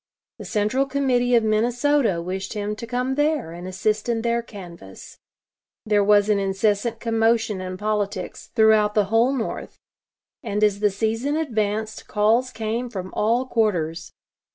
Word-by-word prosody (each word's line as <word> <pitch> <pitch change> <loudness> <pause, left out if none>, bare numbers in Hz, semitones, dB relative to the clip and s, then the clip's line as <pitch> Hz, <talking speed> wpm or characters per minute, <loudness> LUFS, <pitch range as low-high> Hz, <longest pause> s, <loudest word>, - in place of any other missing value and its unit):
The 210 - -8
Central 215 +7 0
Committee 255 -3 +1
of 230 - +4
Minnesota 235 -2 +1
wished 190 +2 -4
him 210 0 -3
to 235 - -7
come 250 +2 -1
there 295 - 0
and 175 +2 -8
assist 210 +4 -1
in 225 -1 0
their 235 0 +1
canvass. 175 - -12 0.7
There 210 -2 +3
was 205 0 +4
an 210 -1 +2
incessant 205 +3 0
commotion 225 -3 +1
in 185 0 -5
politics 205 -2 -3
throughout 220 -2 +4
the 210 -2 +3
whole 235 +3 +4
North, 255 -5 -4 0.6
and 210 +1 -2
as 205 -1 +3
the 210 0 +3
season 225 +8 -1
advanced 220 -7 -2
calls 225 +4 +2
came 230 +2 -3
from 185 -4 -6
all 235 +4 +1
quarters. 175 -10 -1
215 Hz, 150 wpm, -23 LUFS, 205-235 Hz, 0.7 s, of